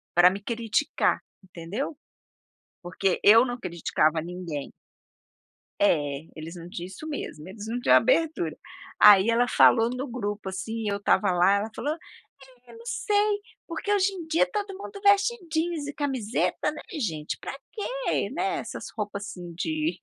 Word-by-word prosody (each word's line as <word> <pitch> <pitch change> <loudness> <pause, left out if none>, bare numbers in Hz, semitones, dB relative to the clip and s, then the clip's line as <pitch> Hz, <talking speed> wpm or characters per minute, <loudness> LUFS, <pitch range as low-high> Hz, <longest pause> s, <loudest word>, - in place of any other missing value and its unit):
Pra 175 +1 +8
me 195 +2 -5
criticar, 230 +4 0 0.2
entendeu? 190 - -5 0.8
Porque 180 +1 -1
eu 225 +4 +8
não 245 -1 -4
criticava 165 -4 0
ninguém. 170 -4 -6 1.1
É, 150 -6 +1
eles 165 +3 -8
não 170 0 -9
tinham 175 0 -6
isso 190 +12 -9
mesmo, 170 - -6
eles 205 +2 -8
não 235 +2 -2
tinham - - +5
abertura. 320 - +2 0.4
Aí 205 +1 +8
ela 235 +1 +3
falou 230 -1 +5
no 250 +2 -3
grupo 205 -4 -4
assim, 220 +3 -4
eu 200 - -1
estava 200 0 +2
lá, 180 +2 +4
ela 210 +2 -1
falou: 295 - -2 0.7
"É, - - -14
não 460 0 -13
sei 420 -3 +1 0.3
por 335 - -6
que 410 - -2
hoje 395 -1 +3
em 345 -4 -7
dia 325 +8 +3
todo 410 -3 -3
mundo 400 0 -8
veste 405 +4 +4
jeans 320 -2 -1
e 290 - -5
camiseta, 260 -7 -1
né, - - -8 0.2
gente, 155 - -3
pra - - -6 0.2
que, - - -2
né, 375 +5 -1
essas - - -7
roupa 205 -1 -3
assim 180 -4 -8
de" 315 - -1
225 Hz, 160 wpm, -26 LUFS, -, 1.1 s, Pra